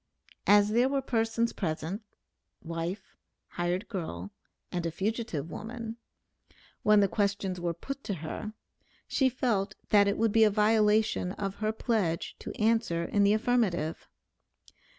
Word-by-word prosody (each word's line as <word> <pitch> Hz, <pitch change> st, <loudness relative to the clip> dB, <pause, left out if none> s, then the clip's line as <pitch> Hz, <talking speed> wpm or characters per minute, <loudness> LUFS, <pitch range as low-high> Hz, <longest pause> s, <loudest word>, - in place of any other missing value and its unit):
As 205 Hz, 0 st, +6 dB
there 240 Hz, +4 st, +3 dB
were 275 Hz, -1 st, 0 dB
persons 230 Hz, -1 st, 0 dB
present 165 Hz, +2 st, -3 dB, 0.6 s
(wife, 170 Hz, +4 st, -5 dB, 0.3 s
hired 175 Hz, +4 st, -2 dB
girl, 100 Hz, -, -5 dB, 0.4 s
and 175 Hz, -1 st, -2 dB
a -, -, 0 dB
fugitive 190 Hz, -, -3 dB
woman), 230 Hz, 0 st, -6 dB, 0.8 s
when 210 Hz, -1 st, +5 dB
the 200 Hz, -, +4 dB
questions 200 Hz, -2 st, -1 dB
were 170 Hz, -1 st, -1 dB
put 275 Hz, +10 st, -6 dB
to 200 Hz, -, -2 dB
her, 170 Hz, +7 st, -6 dB, 0.5 s
she 265 Hz, -2 st, +2 dB
felt 215 Hz, -5 st, 0 dB
that 205 Hz, -1 st, +6 dB
it 200 Hz, -, +1 dB
would 225 Hz, 0 st, +2 dB
be 225 Hz, +1 st, +5 dB
a 215 Hz, -, +6 dB
violation 210 Hz, -2 st, +3 dB
of 195 Hz, -1 st, -4 dB
her 215 Hz, 0 st, +1 dB
pledge 215 Hz, -7 st, -1 dB
to -, -, -6 dB
answer 220 Hz, -6 st, +2 dB
in 205 Hz, +3 st, +2 dB
the 200 Hz, +1 st, +5 dB
affirmative. 215 Hz, -8 st, 0 dB
205 Hz, 140 wpm, -29 LUFS, 180-225 Hz, 0.8 s, As